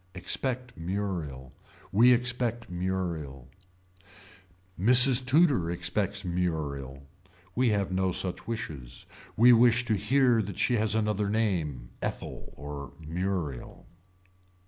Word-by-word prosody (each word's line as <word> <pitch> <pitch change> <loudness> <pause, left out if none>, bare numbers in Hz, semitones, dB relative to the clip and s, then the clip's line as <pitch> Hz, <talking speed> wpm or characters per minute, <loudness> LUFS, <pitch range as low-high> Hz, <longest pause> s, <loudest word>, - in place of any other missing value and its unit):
Expect 125 +7 -2
Muriel. 85 -8 -4 0.4
We 120 +5 +6
expect 120 -2 0
Muriel 85 -8 -4 1.3
Mrs. 125 +4 +6
Tudor 135 - +3
expects 95 +4 -2
Muriel. 75 -7 -3 0.5
We 125 +3 +2
have 100 -3 0
no 95 0 0
such 90 0 -3
wishes. 75 - -6 0.3
We 120 +3 +7
wish 120 +1 +4
to 115 - 0
hear 125 +2 +3
that 100 -2 -6
she 125 - +1
has 110 0 +1
another 105 -2 0
name, 85 - -1
Ethel - - -6
or 75 0 -8
Muriel. 80 -4 -4
95 Hz, 105 wpm, -28 LUFS, 80-115 Hz, 1.3 s, We